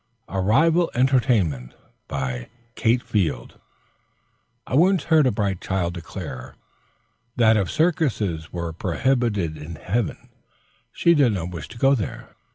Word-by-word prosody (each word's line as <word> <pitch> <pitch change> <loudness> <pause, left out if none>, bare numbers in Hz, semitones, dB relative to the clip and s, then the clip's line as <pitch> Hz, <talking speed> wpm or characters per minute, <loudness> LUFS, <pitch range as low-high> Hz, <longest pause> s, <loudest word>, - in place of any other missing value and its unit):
A 95 0 -2
RIVAL 165 - +3
ENTERTAINMENT 115 - +1 0.3
BY 65 -3 -4 0.2
KATE 120 +1 +1
FIELD 85 - -2 1.1
I - - -8
once 180 +6 +4
heard 160 -4 +4
a - - +2
bright 100 -3 -2
child 90 -3 -1
declare 70 -7 -8 0.8
that 115 -2 +5
if 100 -4 0
circuses 115 - 0
were 85 -2 -4
prohibited 100 -2 0
in 75 +2 -8
heaven, 100 +5 -3 0.6
she 170 - +3
did 140 -8 +3
not 90 -2 -3
wish 85 -2 -7
to 115 - -12
go 135 +3 +4
there. 115 -7 -4
105 Hz, 130 wpm, -23 LUFS, 85-130 Hz, 1.1 s, that